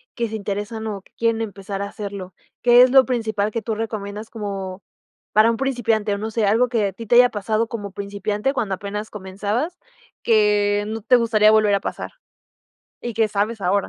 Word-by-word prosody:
que 235 -1 -1
se 220 - -6
interesan 210 +2 -4
o 200 -2 -4
que - - -28
quieren 230 -1 +1
empezar 200 -2 -5
a - - -1
hacerlo? 200 -3 -7 0.3
¿Qué 240 0 +7
es 250 0 +6
lo 265 -1 +7
principal 220 -4 -1
que 230 - -2
tú 220 +1 -3
recomiendas 215 -1 -5
como 195 -3 -5 0.5
para 215 +2 +5
un 230 - +1
principiante, 230 -5 0
o - - -2
no 215 +2 -4
sé, 220 -1 0
algo 225 +5 +3
que 225 -4 +1
a - - -3
ti 230 +4 -9
te 235 - +2
haya 245 0 +7
pasado 215 +2 -1
como 205 -4 -5
principiante, 205 +4 -2
cuando 215 -8 -1
apenas 210 +2 -5
comenzabas, 210 - -3 0.4
que 210 -2 +3
no 220 +1 -4
te 240 +4 +4
gustaría 220 -3 +4
volver 215 -1 +4
a - - +1
pasar, - - -5 0.9
y 240 - -3
qué 225 0 +1
sabes 210 +2 -1
ahora? 195 +2 +1
215 Hz, 200 wpm, -22 LUFS, 200-230 Hz, 0.9 s, Qué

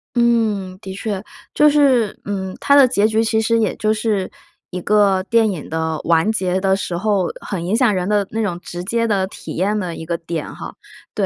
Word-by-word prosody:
嗯， 220 -6 +1
的 190 -3 -7
确。 200 0 -4 0.3
就 300 0 +5
是， 265 -8 +2
嗯， 190 -2 -4
它 280 - +3
的 280 -2 +8
结 215 -4 +2
局 220 +1 +1
其 220 0 +1
实 230 +1 +2
也 220 -4 +1
就 215 0 +1
是 215 -3 -1 0.4
一 180 0 -5
个 200 -1 +3
电 230 -2 +3
影 175 -7 -6
的 160 -1 -2
完 165 +4 +2
结 185 -3 0
的 190 0 +2
时 180 -3 -3
候 200 -2 +1
很 175 -4 -5
影 185 - -1
响 235 -2 +3
人 185 +1 -1
的 205 -2 +1
那 225 - -2
种 175 -4 -2
直 175 0 -7
接 230 +4 0
的 200 -3 +1
体 - - -9
验 200 +4 0
的 175 -4 -4
一 160 - -8
个 170 0 -2
点 165 -2 -5
哈。 - - -8 0.4
对， - - +1
200 Hz, 230 characters per minute, -19 LUFS, 185-220 Hz, 0.4 s, 的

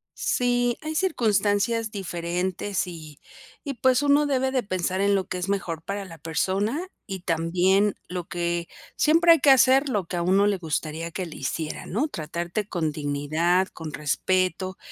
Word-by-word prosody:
Sí, 245 -1 +1
hay 315 +1 -4
circunstancias 225 - +1
diferentes 180 0 -2
y 155 -4 -10 0.4
y 280 - -3
pues, 260 0 +3
uno 290 +1 +4
debe 265 -2 +1
de 255 -2 0
pensar 185 -1 -1
en 200 0 +3
lo 195 -2 0
que 185 - -4
es 180 +2 -3
mejor 175 -5 -2
para 200 +2 -4
la 165 -3 -11
persona 195 - -1 0.2
y 190 -2 -5
también 180 +4 +2
lo 180 0 -4
que 170 0 -2 0.3
siempre 335 +2 +5
hay 330 - +2
que 280 - +4
hacer, 265 +2 +5
lo 205 -7 -1
que 175 - -5
a - - 0
uno 190 +4 +3
le 205 -1 +1
gustaría 165 0 -3
que 185 +2 -4
le 165 - -9
hicieran, 150 +3 -4
¿no? 240 - +1
Tratarte 170 - -4
con 165 -6 -1
dignidad, 155 +5 0
con 160 -5 -8
respeto 185 +5 0
190 Hz, 170 wpm, -25 LUFS, 170-230 Hz, 0.4 s, siempre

